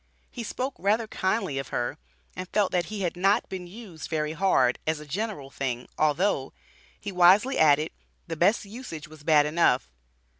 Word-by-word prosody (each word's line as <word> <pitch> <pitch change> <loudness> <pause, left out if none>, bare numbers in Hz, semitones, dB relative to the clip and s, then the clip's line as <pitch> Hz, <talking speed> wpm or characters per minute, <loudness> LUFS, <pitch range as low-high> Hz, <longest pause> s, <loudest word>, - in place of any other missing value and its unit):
He 245 - -6
spoke 255 +4 -3
rather 215 +4 +2
kindly 190 -8 -1
of 135 - -5
her, 120 -1 -3 0.4
and 185 0 -6
felt 205 -3 +1
that 175 -1 0
he 210 -2 -5
"had 175 -2 -1
not 195 +3 +2
been 185 -2 -6
used 185 -5 -9
very 155 -1 -1
hard" 160 -9 +2
as 160 -1 0
a 150 - -10
general 160 -4 -4
thing, 125 -3 -3
although, 155 -1 +1 0.5
he - - -5
wisely 190 +9 +5
added, 155 0 +4 0.3
"the 165 - -5
best 195 +7 +2
usage 200 - -8
was 155 -1 -14
bad 150 -1 +4
enough." 150 - +2
175 Hz, 175 wpm, -27 LUFS, 150-200 Hz, 0.5 s, wisely